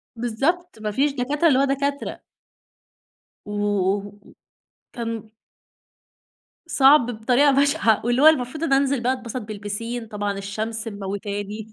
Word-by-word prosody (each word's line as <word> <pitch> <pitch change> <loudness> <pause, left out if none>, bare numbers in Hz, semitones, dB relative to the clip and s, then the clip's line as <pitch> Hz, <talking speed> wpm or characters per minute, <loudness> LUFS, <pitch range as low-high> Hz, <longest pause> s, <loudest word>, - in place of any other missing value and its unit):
بالضبط 270 +7 -2
ما 210 -1 -2
فيش 280 +7 +1
دكاترة، 285 +5 +1
اللي 265 -5 +4
هو - - +4
دكاترة. 280 +1 -2 1.2
وكان 205 0 -3 2.1
صعب 280 -3 +5 0.2
بطريقة 260 +5 +4
بشعة 275 -5 +3
واللي 245 +2 +2
هو 310 - +8
المفروض 305 +1 +2
إن 275 - +1
أنزل 275 -1 +2
بقى 255 +2 +2
أتبسط 250 -1 -6
بالبيسين، 215 +3 -5
طبعًا 205 -2 -3
الشمس 220 +3 -4
مموتاني 205 +1 -5
235 Hz, 115 wpm, -23 LUFS, 205-275 Hz, 2.1 s, هو